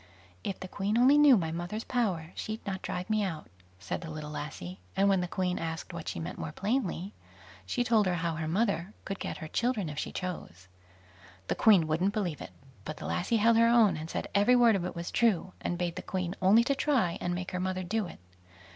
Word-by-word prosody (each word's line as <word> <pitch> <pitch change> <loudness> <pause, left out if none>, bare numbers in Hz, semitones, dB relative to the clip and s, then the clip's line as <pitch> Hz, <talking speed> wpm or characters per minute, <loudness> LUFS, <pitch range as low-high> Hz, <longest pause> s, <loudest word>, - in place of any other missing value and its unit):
"If 195 - -3
the 185 - -6
Queen 200 +4 -1
only 255 +4 +6
knew 285 -5 +8
my 165 -4 -1
mother's 175 +7 -4
power, 185 -10 -1
she'd 220 +1 -5
not 190 -2 -3
drive 180 0 -4
me 215 -1 +1
out", 165 -6 -4 0.3
said 90 - -4
the 165 - -7
little 155 -1 -6
lassie; 95 -13 -6 0.2
and 195 +1 +4
when 195 -2 +3
the 180 - -2
Queen 180 0 -1
asked 165 +1 -5
what 170 -2 -7
she - - -3
meant 80 0 -6
more 80 -1 -4
plainly, 200 -4 -2 0.5
she 245 - 0
told 225 -4 +3
her 180 - +1
how 170 -1 -1
her 160 0 -3
mother 195 0 0
could 195 0 -4
get - - -4
her 160 - -7
children 225 -2 0
if 150 0 -5
she - - -3
chose. 125 - -6 0.8
The - - +3
Queen 200 -7 +5
wouldn't 170 +6 +1
believe 180 -9 -2
it, - - -7 0.3
but 155 - -6
the - - -8
lassie 225 +6 0
held 225 +1 +4
her 230 0 +6
own, 230 -6 +5
and 155 +1 -6
said - - -3
every 205 +5 +5
word 235 -3 +6
of 180 -3 -1
it 180 - -5
was 170 0 -5
true, 195 -6 +2
and 175 - -2
bade 175 -1 -2
the - - -4
Queen 185 -2 -3
only 205 +5 +6
to 280 - +1
try 265 - +1
and 175 0 -1
make 180 +1 -4
her 180 - -2
mother 185 0 -2
do 205 +2 -1
it. - - -11
185 Hz, 230 wpm, -30 LUFS, 165-215 Hz, 0.8 s, knew